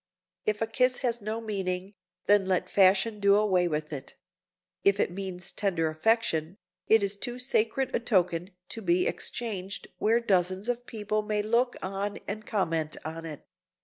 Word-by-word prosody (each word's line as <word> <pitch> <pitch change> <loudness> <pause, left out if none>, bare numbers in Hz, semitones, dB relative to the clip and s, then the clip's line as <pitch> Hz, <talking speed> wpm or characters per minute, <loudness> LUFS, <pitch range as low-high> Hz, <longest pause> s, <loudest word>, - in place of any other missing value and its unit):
If 215 +1 +1
a - - +2
kiss 250 +3 +1
has 240 -1 0
no 215 +2 -3
meaning, 195 -3 -3 0.3
then 205 -2 +4
let 185 -1 0
Fashion 195 +3 +4
do 200 0 +5
away 190 -4 +3
with 150 -1 -3
it; 135 -2 -7 0.7
if 200 0 +4
it - - +2
means 185 -1 -5
tender 175 -6 0
affection, 170 -2 +1 0.3
it 220 -2 +5
is 200 +1 0
too 240 +4 -3
sacred 250 +1 0
a - - +2
token 180 -6 +1 0.2
to 225 - -4
be 180 -2 +2
exchanged 200 -5 -3
where 225 +2 +3
dozens 190 -1 +1
of 245 0 -2
people 215 -1 -1
may 210 -1 -1
look 235 +3 +2
on 195 +2 -3
and 215 +1 -5
comment 165 -7 -1
on 165 +1 -5
it. 150 -3 -9
200 Hz, 165 wpm, -28 LUFS, 180-225 Hz, 0.7 s, do